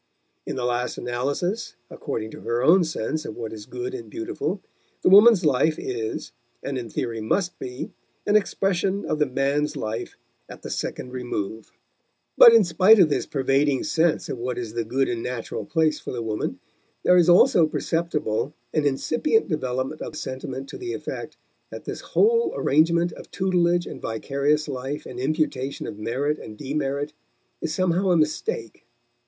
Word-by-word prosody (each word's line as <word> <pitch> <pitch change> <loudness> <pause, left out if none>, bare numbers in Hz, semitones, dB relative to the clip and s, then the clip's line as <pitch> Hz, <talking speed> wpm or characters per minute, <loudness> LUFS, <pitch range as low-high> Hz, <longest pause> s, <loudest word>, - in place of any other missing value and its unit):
In - - -3
the 125 - -2
last 125 0 -1
analysis, 140 - -2 0.2
according 110 0 -4
to - - -10
her 120 +1 -1
own 175 +6 +6
sense 155 -1 -3
of 110 - -7
what 115 -2 -5
is 105 -2 -9
good 380 +1 -5
and 380 -2 -7
beautiful, 340 +2 -3 0.4
the - - +5
woman's 205 -1 +8
life 150 +2 +3
is, 115 -3 -4 0.3
and 140 - -3
in 120 -3 -4
theory 115 0 -3
must 180 - -1
be, 125 0 -6 0.3
an 210 - +2
expression 195 -1 +1
of 155 - -1
the 150 - +3
man's 140 +3 0
life 110 +1 -4 0.3
at - - -11
the - - -6
second 125 - -4
remove. 110 -4 -4 0.6
But 235 - +10
in 230 -2 +7
spite 185 +5 +6
of 180 -6 +6
this 145 - -1
pervading 135 0 +1
sense 160 +1 +1
of 125 - -5
what 125 +1 -3
is 115 -3 -5
the 115 0 -1
good 130 +4 0
and 120 -1 -2
natural 115 -4 -4
place 160 -2 +1
for - - -6
the 120 -2 -4
woman, 110 -1 -3 0.5
there 180 - +5
is 175 -1 +5
also 175 -2 +6
perceptible 155 -6 -1 0.2
an 150 -2 +2
incipient 160 - +1
development 130 -1 -2
of - - -6
sentiment 130 0 -5
to - - -8
the 365 0 -4
effect - - -6 0.3
that - - -9
this - - -5
whole 465 +2 +3
arrangement 170 +4 +3
of - - -12
tutelage 175 -2 +1
and - - -8
vicarious 140 +6 0
life 135 +1 -4
and 125 - -8
imputation 140 -1 -1
of 105 - -7
merit 135 +7 -1
and 105 - -10
demerit 145 +1 -2 0.5
is 155 - -2
somehow 185 +2 +1
a 175 - +4
mistake. 135 -7 -2
145 Hz, 170 wpm, -24 LUFS, 125-175 Hz, 0.6 s, But